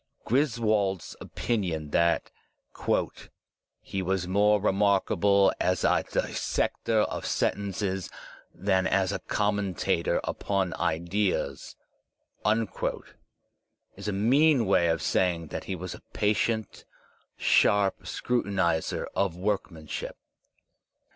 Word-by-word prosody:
Griswold's 110 - +1
opinion 85 -10 -2
that 85 +1 +2 0.4
''he 95 - -5
was 95 -1 -1
more 105 +3 +3
remarkable 100 -1 +3
as 90 -1 +1
a - - +3
dissector 110 -2 0
of - - -2
sentences 95 -1 -1 0.4
than 95 -1 +1
as 95 -1 +1
a - - -2
conunenter 105 -4 0
upon 95 -4 -1
ideas,*' 90 +5 -1 2.2
is - - -8
a - - +1
mean 125 +6 +3
way 90 -3 +3
of 80 - 0
saying 85 -4 +1
that - - -5
he 95 - -3
was 90 0 -6
a - - -11
patient, 105 +1 0 0.5
sharp 100 -1 +3
scrutinizer 95 -9 -1
of 80 - 0
workmanship. 90 -5 -3
100 Hz, 95 wpm, -27 LUFS, 90-105 Hz, 2.2 s, more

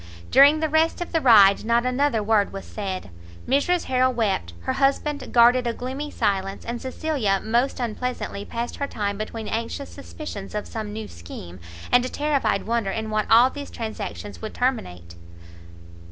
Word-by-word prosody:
During 285 +3 +7
the 315 - +2
rest 315 +2 +2
of 350 - -5
the 325 - +1
ride 205 -6 +7
not 235 +2 +2
another 255 -3 +1
word 210 -1 +2
was 195 0 -7
said; 190 - -5 0.4
Mrs 285 +7 +2
Harrel 255 0 +2
wept, 200 - -1
her - - -2
husband 280 +1 0
guarded 245 +1 +5
a 235 - 0
gloomy 265 +5 -5
silence, 195 -5 -1
and 235 0 -4
Cecilia 260 -7 -1
most 240 +6 0
unpleasantly 240 -3 -3
passed 235 +3 -5
her 280 - -2
time 200 -4 -2
between 215 +1 -5
anxious 230 +5 -4
suspicions 275 -9 -8
of 210 - -3
some 215 -2 -5
new 215 0 -6
scheme, 85 +1 -10 0.3
and 245 0 +5
a 255 - -3
terrified 275 -9 0
wonder 230 -3 0
in 220 +2 -3
what 215 0 -1
all 240 +3 +6
these 285 -1 -7
transactions 220 -2 -6
would 220 - -6
terminate. 90 - -2
235 Hz, 170 wpm, -24 LUFS, 205-270 Hz, 0.4 s, During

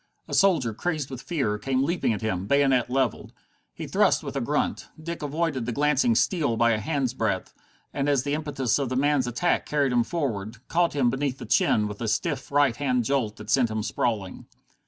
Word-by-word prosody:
A - - -8
soldier, 165 - +3
crazed 150 +2 -3
with 130 -2 -6
fear, 135 -8 -1
came 130 +1 0
leaping 170 -3 0
at 110 - -3
him, 95 -3 -2
bayonet 135 -3 +3
leveled. 130 -2 -1 0.4
He - - -7
thrust - - +2
with - - -6
a - - -1
grunt. - - -1
Dick 170 +2 -6
avoided 145 -4 -2
the - - 0
glancing 140 -3 +2
steel 145 - +1
by 120 0 +4
a 110 - +1
hand's 135 0 -1
breadth, 110 -7 -2 0.4
and, 140 0 0
as 140 -3 +2
the 145 - -2
impetus 145 -5 0
of 135 -3 -1
the 130 - -2
man's 140 -1 +2
attack 120 +9 0
carried 145 -3 +1
him 120 -1 +3
forward, 115 -7 -3
caught 170 -2 +1
him 125 -4 +2
beneath 135 -1 -2
the - - -8
chin 105 0 +2
with 105 +1 -8
a 115 - -2
stiff 140 +4 -2
right 140 -5 +3
hand 125 -3 +1
jolt 125 -6 0
that 105 -1 -7
sent 125 -1 +3
him 110 -1 -2
sprawling. 105 -1 -2
130 Hz, 205 wpm, -25 LUFS, 115-145 Hz, 0.4 s, by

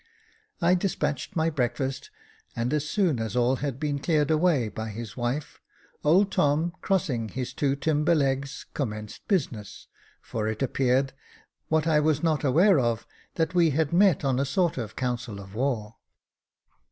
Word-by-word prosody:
I 175 +1 +4
despatched 155 -7 -1
my 160 0 +1
breakfast, 130 0 -2 0.5
and 120 +4 -1
as 150 0 -1
soon 170 - +1
as 110 -1 -3
all 125 +2 +2
had 140 -2 -3
been 145 -2 -1
cleared 150 0 +1
away 155 -6 +3
by 110 +2 -5
his 110 +1 -7
wife, 125 +4 -3 0.4
old 185 +7 +4
Tom, 155 +4 +2
crossing 130 - 0
his 130 +2 -4
two 140 -1 +1
timber 150 +3 +2
legs, 140 -1 -1
commenced 105 -6 -5
business, 130 - -2 0.3
for 110 -1 -4
it 110 +4 -2
appeared, 135 +1 +1 0.5
what 160 -1 +1
I 155 -2 +4
was 150 0 +1
not 155 -3 +1
aware 165 +6 +5
of, 115 -2 0 0.3
that 165 +1 0
we 170 -2 +4
had 160 -1 +1
met 180 -5 +4
on 130 -1 +1
a - - +2
sort 165 +1 0
of 110 -2 -5
council 120 -4 -3
of 95 -1 -11
war. 115 -3 -2
140 Hz, 160 wpm, -26 LUFS, 120-160 Hz, 0.5 s, aware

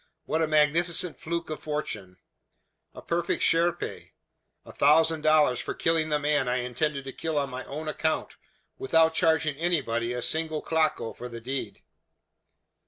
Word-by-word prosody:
"What 160 - 0
a 160 - +2
magnificent 160 +3 +2
fluke 170 0 -4
of 155 - -4
fortune! 110 -12 -5 0.8
A - - -10
perfect 170 0 -1
chiripe. 170 +1 0 0.5
A - - -11
thousand 160 +2 +3
dollars 155 -5 +4
for - - -4
killing 165 -1 +1
the 150 - +2
man 145 -2 +1
I 125 - +1
intended 130 +4 -2
to 135 - -6
kill 160 -2 -3
on 140 -1 -1
my 130 +1 -5
own 155 +3 -6
account, 160 0 -2 0.4
without 160 +3 +3
charging 160 -3 +2
anybody 135 -9 0
a 125 -1 -3
single 160 -1 0
claco 155 -7 0
for 125 - -8
the 115 -1 -7
deed! 130 +3 -5
155 Hz, 155 wpm, -27 LUFS, 135-160 Hz, 0.8 s, dollars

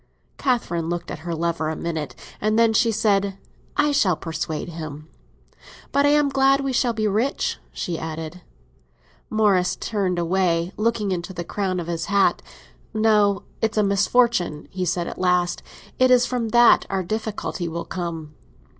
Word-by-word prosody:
Catherine 170 - 0
looked 175 0 -3
at - - -6
her 170 - -1
lover 165 -1 -1
a 160 - -2
minute, 160 -3 -4 0.3
and 215 +1 +1
then 230 -1 +4
she 230 +1 +3
said, 200 -2 +1 0.4
"I 295 0 +3
shall 195 - +3
persuade 165 0 -4
him. 155 -2 -7 0.8
But 280 +1 +3
I - - +5
am 295 -1 +4
glad 270 0 +3
we 275 -1 -2
shall 245 0 +2
be 215 -1 0
rich," 220 +8 0
she 170 -2 -4
added. 160 +2 -6 0.9
Morris 195 -4 +2
turned 195 -5 -1
away, 175 0 +1
looking 215 -2 0
into 180 +1 -3
the 175 -1 -4
crown 185 0 -2
of 170 - -4
his 170 0 -3
hat. 200 0 +2 0.5
"No, 210 -2 +3 0.2
it's 220 -1 0
a 210 - +4
misfortune," 200 -4 +2
he 185 -1 -2
said 175 0 0
at - - -7
last. 180 -1 +1 0.4
"It 255 0 +5
is 250 -1 +5
from 240 -3 -2
that 240 +1 +5
our 195 -1 -1
difficulty 215 -3 -3
will 170 +1 -4
come." 165 -4 -5
190 Hz, 165 wpm, -23 LUFS, 170-225 Hz, 0.9 s, I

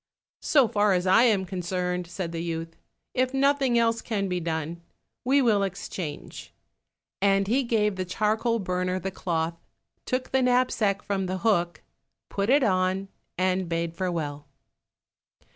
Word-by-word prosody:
"So 275 -6 +4
far 205 -1 +2
as 180 0 0
I 210 +6 +6
am 205 -5 +2
concerned," 180 -1 -3
said 175 -1 -5
the 165 -1 -4
youth, 165 -1 -4 0.4
"if 255 +1 0
nothing 275 -2 +3
else 230 0 +2
can 200 -4 -2
be 180 -1 -1
done, 165 0 -3 0.4
we 270 +2 +3
will 215 -4 +3
exchange," 185 -4 -6 0.7
and 195 0 +3
he 250 +6 +2
gave 210 -5 +1
the 185 - -1
charcoal 215 +5 0
burner 180 -2 -1
the 190 +2 -4
cloth, 165 -2 -2 0.5
took 255 0 -2
the 265 - +3
knapsack 245 -5 +2
from 195 -2 -2
the 185 +1 -2
hook, 175 -6 +1 0.5
put 200 +2 -1
it 280 +1 +5
on, 185 -1 +1 0.3
and 185 -1 0
bade 165 0 -2
farewell. 155 -5 -3
190 Hz, 145 wpm, -26 LUFS, 175-230 Hz, 0.7 s, I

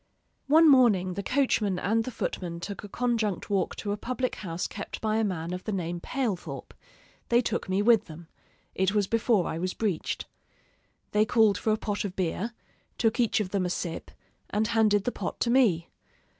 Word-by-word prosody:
One 320 +3 +6
morning 220 -10 +5
the 200 - -3
coachman 215 -5 +1
and 220 +5 +1
the - - -3
footman 175 -7 -4
took 200 +4 -6
a 205 - -8
conjunct 225 -5 -1
walk 195 -3 0
to 205 - -4
a 205 - -1
public 255 +3 -2
house 170 -3 -4
kept 200 - -6
by 215 0 0
a 225 - +2
man 180 -4 -2
of 180 - -6
the 215 - -2
name 175 -3 -2
Palethorp; 225 -3 -3 0.6
they 235 - +5
took 235 - -2
me 190 +2 +1
with 230 -1 +5
them: 160 +1 -11 0.5
it 190 +2 +1
was 205 -1 +3
before 225 -2 +2
I 160 - -3
was 185 +1 -2
breeched. 200 -8 -2 0.9
They 210 +1 +4
called 215 -2 +3
for 220 - +1
a 215 - +2
pot 205 -1 -2
of 195 -2 -5
beer; 190 +6 -2 0.4
took 225 +1 +1
each 235 -2 +2
of 205 -4 -2
them 200 -2 0
a 180 - -1
sip, 170 -2 -4 0.4
and 210 +2 +1
handed 215 -3 +3
the 245 - -1
pot - - -5
to 235 - +2
me. 215 -11 +3
205 Hz, 195 wpm, -28 LUFS, 185-230 Hz, 0.9 s, One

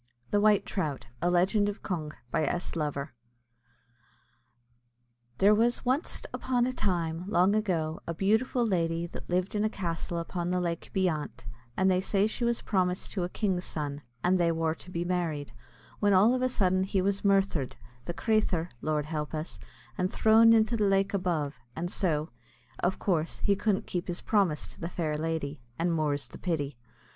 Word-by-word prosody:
THE 205 - +3
WHITE 210 -1 +4
TROUT; 150 -8 -3 0.2
A 175 - +2
LEGEND 190 +4 +3
OF 205 - -7
CONG. 155 -5 -3 0.2
BY 155 - +1
S. 175 +5 -2
LOVER. 150 -2 -2 2.2
There 205 +2 +6
was 235 +4 +2
wanst 260 +5 0
upon 250 -2 +1
a 255 - -1
time, 175 -6 -1
long 190 -1 +4
ago, 170 -7 0
a 170 - -3
beautiful 220 +7 +2
lady 170 -4 0
that 170 - -9
lived 180 +2 0
in 210 0 +1
a 215 - +2
castle 170 -4 -3
upon 170 +1 -3
the 180 0 +1
lake 170 -2 -3
beyant, 165 - -1 0.3
and 190 0 +4
they 185 0 +2
say 195 +1 +2
she 220 +3 -2
was 235 0 0
promised 185 -3 0
to 185 - -1
a 175 - -2
king's 185 -3 -1
son, 145 -2 -4 0.2
and 185 +1 +3
they 170 -1 +3
wor 160 -1 0
to 170 - -12
be 170 -1 -2
married, 165 -7 -1 0.5
when 205 -1 +3
all 205 +6 +6
of 255 - 0
a 255 - +2
sudden 185 -5 +2
he 190 0 0
was 195 +1 0
murthered, 195 -9 +2 0.3
the 175 - -3
crathur 195 -7 +1
(Lord 150 -1 0
help 155 0 -3
us), 155 +2 -4 0.4
and 185 0 +1
threwn 225 +1 +6
into 225 +1 +4
the 210 -3 +2
lake 195 0 +2
above, 170 -7 0 0.2
and 175 +2 -3
so, 155 -4 0 0.5
of 180 +2 0
course, 165 -4 -1
he 200 - +3
couldn't 195 0 0
keep 175 -1 -3
his 175 0 -3
promise 195 -8 +1
to - - -11
the 165 - -3
fair 160 -4 -2
lady, 155 -3 -3 0.2
and 170 +1 +1
more's 150 -3 0
the - - -12
pity. 145 -7 -2
180 Hz, 180 wpm, -29 LUFS, 165-200 Hz, 2.2 s, There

